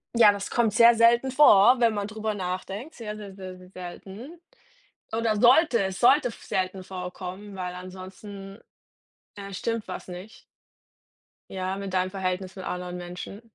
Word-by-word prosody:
ja, 225 Hz, -3 st, +7 dB
das 200 Hz, -1 st, -5 dB
kommt 230 Hz, -4 st, +1 dB
sehr 230 Hz, +1 st, +7 dB
selten 235 Hz, +3 st, +4 dB
vor, 250 Hz, -3 st, +7 dB
wenn 230 Hz, -2 st, +3 dB
man 205 Hz, -1 st, -2 dB
drüber 215 Hz, 0 st, -3 dB
nachdenkt, 195 Hz, -, -5 dB
sehr, 215 Hz, -2 st, -6 dB
sehr, 205 Hz, -2 st, -9 dB
sehr, 185 Hz, -1 st, -8 dB
sehr 180 Hz, 0 st, -15 dB
selten 195 Hz, -, -10 dB, 0.7 s
oder 225 Hz, -1 st, 0 dB
sollte 250 Hz, +1 st, +5 dB
es 190 Hz, 0 st, -4 dB
sollte 255 Hz, +2 st, +5 dB
f 230 Hz, -, -12 dB
selten 185 Hz, 0 st, -2 dB
vorkommen, 185 Hz, +2 st, -7 dB
weil 180 Hz, -1 st, -5 dB
ansonsten, 190 Hz, +2 st, -10 dB, 0.8 s
äh, 200 Hz, -1 st, -8 dB
stimmt 230 Hz, +2 st, -3 dB
was -, -, -7 dB
nicht 185 Hz, +4 st, -10 dB, 1.1 s
ja, 185 Hz, 0 st, -3 dB
mit 195 Hz, -1 st, -6 dB
deinem 185 Hz, 0 st, +1 dB
Verhältnis 185 Hz, -1 st, -3 dB
mit 190 Hz, -, -8 dB
anderen 180 Hz, 0 st, -4 dB
Menschen. 180 Hz, +3 st, -8 dB
195 Hz, 155 wpm, -26 LUFS, 185-225 Hz, 1.1 s, ja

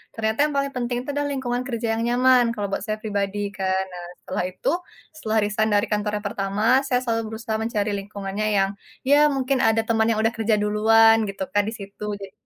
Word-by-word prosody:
ternyata 220 Hz, 0 st, -1 dB
yang 295 Hz, -, -5 dB
paling 275 Hz, 0 st, 0 dB
penting 245 Hz, 0 st, -1 dB
itu 285 Hz, -, -9 dB
adalah 290 Hz, 0 st, -1 dB
lingkungan 250 Hz, -2 st, -2 dB
kerja 235 Hz, -3 st, -3 dB
yang 230 Hz, -, -1 dB
nyaman, 250 Hz, +1 st, +4 dB
kalau 205 Hz, -1 st, -2 dB
buat -, -, -1 dB
saya 215 Hz, -, -1 dB
pribadi 205 Hz, -1 st, -2 dB, 0.2 s
kan. 190 Hz, 0 st, 0 dB
Nah, 175 Hz, -1 st, -7 dB, 0.2 s
setelah 185 Hz, -, -2 dB
itu, 185 Hz, -, -2 dB, 0.5 s
setelah 220 Hz, -7 st, -2 dB
resign 215 Hz, +1 st, 0 dB
dari 205 Hz, -, +2 dB
kantor 210 Hz, 0 st, 0 dB
yang 210 Hz, -, -15 dB
pertama, 195 Hz, +1 st, -3 dB, 0.2 s
saya 250 Hz, -2 st, +2 dB
selalu 230 Hz, -2 st, 0 dB
berusaha 220 Hz, 0 st, -3 dB
mencari 215 Hz, -2 st, -1 dB
lingkungannya 200 Hz, +1 st, -4 dB
yang 195 Hz, 0 st, +3 dB, 0.4 s
ya 285 Hz, +1 st, +6 dB, 0.2 s
mungkin 270 Hz, 0 st, 0 dB
ada 225 Hz, 0 st, +3 dB
teman 225 Hz, -1 st, +2 dB
yang 220 Hz, -, 0 dB
udah 225 Hz, -, +3 dB
kerja 220 Hz, -1 st, +1 dB
duluan 225 Hz, +2 st, +5 dB
gitu 195 Hz, -1 st, -4 dB
kan 205 Hz, -, +3 dB
di -, -, -6 dB
situ. 200 Hz, 0 st, -9 dB, 0.2 s
Jadi, 195 Hz, -1 st, -8 dB
220 Hz, 205 wpm, -23 LUFS, 205-235 Hz, 0.5 s, ya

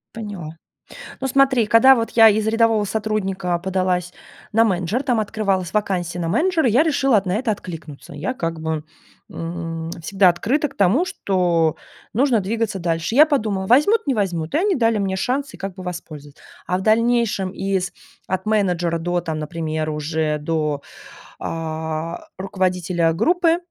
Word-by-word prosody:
Поняла. 195 Hz, -8 st, -7 dB, 0.6 s
Ну 265 Hz, -, -1 dB
смотри, 265 Hz, -3 st, +3 dB
когда 245 Hz, +5 st, +7 dB
вот 230 Hz, -1 st, -2 dB
я 225 Hz, -1 st, +7 dB
из 215 Hz, 0 st, +1 dB
рядового 225 Hz, -1 st, +2 dB
сотрудника 195 Hz, -4 st, -1 dB
подалась 185 Hz, -1 st, -1 dB, 0.4 s
на 225 Hz, +2 st, +4 dB
менеджера, 195 Hz, +4 st, 0 dB
там 250 Hz, -5 st, +1 dB
открывалась 200 Hz, -4 st, -1 dB
вакансия 180 Hz, -4 st, -1 dB
на 165 Hz, -, -2 dB
менеджер, 330 Hz, -, +1 dB
я 245 Hz, +6 st, +4 dB
решила 270 Hz, -8 st, +3 dB
на 180 Hz, -1 st, -1 dB
это 230 Hz, +2 st, 0 dB
откликнуться. 165 Hz, -8 st, -7 dB
Я 155 Hz, -, -3 dB
как 165 Hz, -7 st, -3 dB
бы, 160 Hz, -1 st, -3 dB, 0.4 s
м, 165 Hz, -1 st, -5 dB
всегда 190 Hz, +3 st, +3 dB
открыта 255 Hz, -, +1 dB
к 275 Hz, -, -20 dB
тому, 205 Hz, -, +3 dB
что 175 Hz, -, +1 dB, 0.4 s
нужно 250 Hz, 0 st, +3 dB
двигаться 215 Hz, +1 st, -2 dB
дальше. 170 Hz, +4 st, -1 dB
Я 305 Hz, +2 st, +8 dB
подумала: 215 Hz, -10 st, -1 dB
возьмут, 300 Hz, -, +4 dB
не 275 Hz, -, +1 dB
возьмут, 175 Hz, -7 st, -2 dB
и -, -, +3 dB
они 390 Hz, +2 st, +2 dB
дали 230 Hz, -3 st, +2 dB
мне 195 Hz, -1 st, -1 dB
шанс 265 Hz, +8 st, -2 dB
и -, -, -8 dB
как 195 Hz, -1 st, -6 dB
бы 185 Hz, -, -9 dB
воспользоваться. 155 Hz, -5 st, -8 dB, 0.3 s
А 180 Hz, +1 st, +1 dB
в -, -, -5 dB
дальнейшем 225 Hz, -3 st, +2 dB
из 190 Hz, -1 st, -2 dB, 0.4 s
от 185 Hz, +1 st, -2 dB
менеджера 180 Hz, -6 st, +1 dB
до, 175 Hz, +1 st, -1 dB
например, 155 Hz, 0 st, -3 dB
уже 150 Hz, 0 st, -1 dB
до, 150 Hz, -2 st, -2 dB, 0.6 s
а, 160 Hz, -, -4 dB
руководителя 180 Hz, -3 st, 0 dB
группы 330 Hz, -, +2 dB
190 Hz, 155 wpm, -21 LUFS, 170-230 Hz, 0.6 s, Я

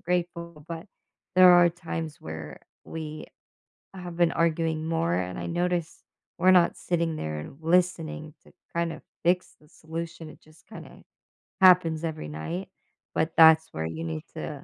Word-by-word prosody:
grateful, 170 Hz, -3 st, -3 dB
but 165 Hz, +2 st, -6 dB, 0.5 s
there 185 Hz, 0 st, +8 dB
are 175 Hz, 0 st, +7 dB
times 165 Hz, -3 st, -6 dB
where 80 Hz, -3 st, -8 dB, 0.2 s
we 155 Hz, -1 st, -7 dB, 0.7 s
have 180 Hz, -2 st, -8 dB
been 175 Hz, -1 st, +3 dB
arguing 160 Hz, -1 st, 0 dB
more 125 Hz, -, 0 dB
and 90 Hz, 0 st, -2 dB
I -, -, -4 dB
noticed, 175 Hz, -1 st, -2 dB, 0.3 s
we're 185 Hz, -, +5 dB
not 180 Hz, -2 st, +5 dB
sitting 170 Hz, -2 st, -1 dB
there 75 Hz, -, -4 dB
and 80 Hz, -, -9 dB
listening 165 Hz, -3 st, 0 dB
to -, -, -19 dB, 0.2 s
kind 170 Hz, -1 st, -1 dB
of 155 Hz, -, -10 dB, 0.2 s
fix 180 Hz, +1 st, +1 dB
the 150 Hz, -, -22 dB
solution, 165 Hz, 0 st, -7 dB
it -, -, -16 dB
just 155 Hz, +1 st, -22 dB
kind -, -, -10 dB
of -, -, -16 dB, 0.6 s
happens 175 Hz, -4 st, +5 dB
every 155 Hz, -, -4 dB
night, 170 Hz, -, -5 dB, 0.4 s
but 160 Hz, +1 st, -1 dB
that's 160 Hz, 0 st, +7 dB
where 80 Hz, 0 st, -3 dB
you 80 Hz, 0 st, -5 dB
need 80 Hz, -1 st, -4 dB
to -, -, -6 dB
165 Hz, 160 wpm, -27 LUFS, 155-175 Hz, 0.7 s, there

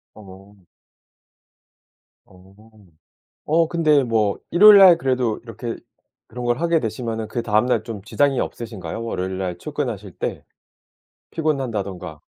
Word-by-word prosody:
어. 95 Hz, -1 st, -15 dB, 1.6 s
어. 95 Hz, +1 st, -20 dB, 0.9 s
어 165 Hz, +2 st, +3 dB
근데 155 Hz, -4 st, +2 dB
뭐 110 Hz, -4 st, 0 dB
일요일 205 Hz, +3 st, +8 dB
날 185 Hz, -3 st, +8 dB
그래도 125 Hz, -7 st, -1 dB
이렇게 115 Hz, 0 st, -6 dB, 0.5 s
그런 125 Hz, +1 st, -7 dB
걸 120 Hz, 0 st, 0 dB
하게 170 Hz, 0 st, +2 dB
되시면은 115 Hz, -2 st, -4 dB
그다음 115 Hz, -1 st, 0 dB
날 115 Hz, -3 st, +1 dB
좀 110 Hz, -4 st, -7 dB
지장이 140 Hz, +4 st, +1 dB
없으신가요? 115 Hz, -1 st, -5 dB
월요일 95 Hz, -4 st, -4 dB
날 90 Hz, -2 st, -4 dB
출근하실 115 Hz, -, -5 dB
때? -, -, -4 dB, 0.9 s
피곤한다든가. 110 Hz, -, -3 dB
115 Hz, 260 characters per minute, -21 LUFS, 100-145 Hz, 1.6 s, 일요일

